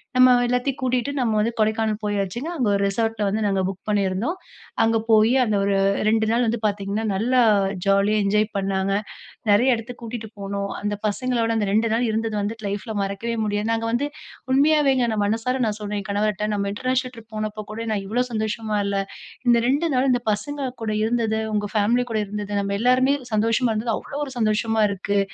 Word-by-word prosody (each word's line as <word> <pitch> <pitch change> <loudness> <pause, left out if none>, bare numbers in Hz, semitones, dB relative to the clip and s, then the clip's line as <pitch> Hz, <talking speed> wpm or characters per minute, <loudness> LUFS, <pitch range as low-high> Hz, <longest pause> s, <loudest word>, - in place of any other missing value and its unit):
நம்ம 255 0 +7
எல்லாத்தையும் 250 +2 0
கூட்டிட்டு 255 +2 0
நம்ம 230 -3 +1
வந்து 220 +2 +1
கொடைக்கானல் 220 0 +1
போயாச்சுங்க. 205 - -2
அங்க 245 -5 +1
ஒரு 200 - +1
ரிசார்ட்ல 225 +1 -1
வந்து 215 +2 -1
நாங்க 195 -1 +1
புக் 195 0 -6
பண்ணிருந்தோம். 205 - 0 0.5
அங்க 225 0 +3
போயி 220 +2 +5
அந்த 215 -3 0
ஒரு 200 0 +1 0.3
2 220 0 +2
நாள் 240 +1 +2
வந்து 230 0 0
பாத்தீங்கன்னா, 205 +1 -1
நல்லா 245 +6 +2 0.4
ஜாலியா 200 +2 +3
என்ஜாய் 210 +2 +2
பண்ணாங்க. 195 0 0 0.6
நெறைய 240 +5 +5
எடத்துக்கு 235 +2 -8
கூட்டிட்டு 225 -2 -6
போனோம். 200 0 -3
அந்த 205 0 -1
பசங்களோட 235 +1 0
அந்த 205 -2 0
2 220 +2 +2
நாள் 240 +2 +1
இருந்தது 220 0 -1
வந்துட்டு 215 +1 -4
லைஃப்ல 205 +2 -4
மறக்கவே 200 +4 -3
முடியாது. 205 +1 -1
நாங்க 225 0 -1
வந்து 255 +5 0 0.5
உண்மையாவேங்க 280 -2 +4
நான் 210 -1 0
மனசார 230 +5 -1
நான் 210 - -2
சொன்னேன் 210 0 -3
என் - - -11
கணவர்ட்ட, 210 0 0
"நம்ம 200 0 -1
இன்டர்நேஷனல் 255 +2 -1
ட்ரிப் 225 -1 -14
போனப்போ 215 0 -3
கூட 230 +1 -5
நான் 200 - -2
இவ்ளோ 245 +4 +1
சந்தோஷமா 215 -1 -2
இல்ல. 200 0 -1 0.5
இந்த 240 -1 +6
2 290 +6 +1
நாள் 260 +1 +2 0.2
பசங்க 265 +5 -3
கூட 220 - -1
இருந்தது, 225 -1 0 0.2
உங்க 205 -1 -1
ஃபேமிலி 235 +4 +2
கூட 215 - 0
இருந்தது, 205 0 -5
நம்ம 200 0 -2
எல்லாருமே 255 +3 +3 0.2
சந்தோஷமா 230 +3 +2
இருந்தது, 225 +1 -1
அவ்ளோ 285 - -7
ஒரு 270 - -9
சந்தோஷமா 220 0 +1
இருக்கு" 200 +1 -1
220 Hz, 180 wpm, -23 LUFS, 205-240 Hz, 0.6 s, நம்ம